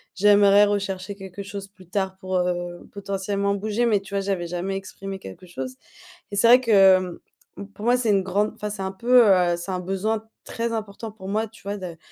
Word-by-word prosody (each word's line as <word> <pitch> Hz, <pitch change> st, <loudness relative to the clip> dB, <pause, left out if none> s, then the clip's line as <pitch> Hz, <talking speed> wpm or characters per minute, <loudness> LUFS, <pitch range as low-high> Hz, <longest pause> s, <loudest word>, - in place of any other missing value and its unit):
j'aimerais 205 Hz, +1 st, +6 dB
rechercher 200 Hz, -1 st, -2 dB
quelque 195 Hz, 0 st, -9 dB
chose 200 Hz, 0 st, -7 dB
plus 190 Hz, -3 st, -19 dB
tard 190 Hz, 0 st, -1 dB
pour, 185 Hz, -1 st, -2 dB
heu, 175 Hz, -1 st, -2 dB
potentiellement 200 Hz, 0 st, -2 dB
bouger, 215 Hz, +4 st, -1 dB
mais 215 Hz, -4 st, +3 dB
tu 195 Hz, 0 st, -13 dB
vois, 200 Hz, -, +1 dB
j'avais 190 Hz, -3 st, -2 dB
jamais 180 Hz, +3 st, -3 dB
exprimé 195 Hz, 0 st, -7 dB
quelque 95 Hz, -, -11 dB
chose 130 Hz, -6 st, -6 dB, 0.6 s
et -, -, -4 dB
c'est 230 Hz, -, +5 dB
vrai 245 Hz, +2 st, +8 dB
que, 195 Hz, -5 st, +6 dB, 0.6 s
mmh, 200 Hz, -, -6 dB
pour 210 Hz, -, -8 dB
moi, 245 Hz, +1 st, +4 dB
c'est 240 Hz, -3 st, 0 dB
une 200 Hz, -2 st, +3 dB
grande, 200 Hz, +3 st, 0 dB
enfin, 210 Hz, -1 st, -4 dB
c'est 205 Hz, -1 st, -6 dB
un 190 Hz, -, -2 dB
peu, 240 Hz, +2 st, +5 dB
heu, 180 Hz, -3 st, +4 dB
c'est 175 Hz, +3 st, -6 dB
un 185 Hz, -, -2 dB
besoin 205 Hz, +4 st, -2 dB, 0.2 s
très 230 Hz, 0 st, -3 dB
important 215 Hz, 0 st, -5 dB
pour 195 Hz, -3 st, -9 dB
moi, 215 Hz, +2 st, 0 dB
tu 225 Hz, -, -18 dB
vois 200 Hz, +1 st, -4 dB
de 180 Hz, -4 st, -7 dB
200 Hz, 215 wpm, -24 LUFS, 185-210 Hz, 0.6 s, vrai